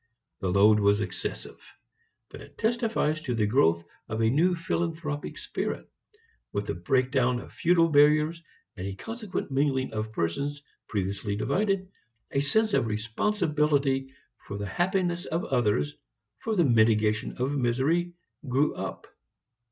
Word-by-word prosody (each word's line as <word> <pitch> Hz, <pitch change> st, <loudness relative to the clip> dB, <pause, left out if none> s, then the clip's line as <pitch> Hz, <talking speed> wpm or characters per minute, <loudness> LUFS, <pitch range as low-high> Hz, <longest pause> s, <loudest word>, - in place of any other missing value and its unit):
The 95 Hz, -, -1 dB
load 105 Hz, +3 st, +5 dB
was 100 Hz, 0 st, +3 dB
excessive. 95 Hz, -3 st, -5 dB, 0.7 s
But -, -, -10 dB
it -, -, -15 dB
testifies 225 Hz, -9 st, 0 dB
to 125 Hz, -5 st, -2 dB
the 110 Hz, -2 st, +2 dB
growth 85 Hz, -8 st, +3 dB, 0.3 s
of 110 Hz, 0 st, -3 dB
a 110 Hz, 0 st, +3 dB
new 175 Hz, +7 st, +3 dB
philanthropic 165 Hz, -3 st, -3 dB
spirit. -, -, -4 dB, 0.6 s
With 100 Hz, 0 st, -2 dB
the -, -, -2 dB
breaking 125 Hz, +9 st, +1 dB
down 125 Hz, -2 st, +2 dB
of -, -, -11 dB
feudal 170 Hz, -1 st, +3 dB
barriers 150 Hz, +2 st, +4 dB, 0.3 s
and 95 Hz, -2 st, -5 dB
a 95 Hz, -, -5 dB
consequent 220 Hz, -, -5 dB
mingling 135 Hz, -1 st, +1 dB
of 110 Hz, 0 st, -3 dB
persons 140 Hz, -, -2 dB, 0.2 s
previously 100 Hz, 0 st, -2 dB
divided, 195 Hz, -, 0 dB, 0.4 s
a 140 Hz, -, +1 dB
sense 215 Hz, +10 st, +2 dB
of 115 Hz, -, +2 dB
responsibility 140 Hz, -, 0 dB, 0.3 s
for 100 Hz, -, -7 dB
the 100 Hz, -, -4 dB
happiness 175 Hz, -, 0 dB
of 165 Hz, +3 st, -2 dB
others, 125 Hz, +3 st, +1 dB, 0.4 s
for 225 Hz, -1 st, -2 dB
the 175 Hz, -4 st, +4 dB
mitigation 110 Hz, -3 st, +3 dB
of 130 Hz, +3 st, 0 dB
misery, 145 Hz, +7 st, +1 dB, 0.4 s
grew 140 Hz, +4 st, +2 dB
up. -, -, -6 dB
135 Hz, 140 wpm, -27 LUFS, 110-165 Hz, 0.7 s, load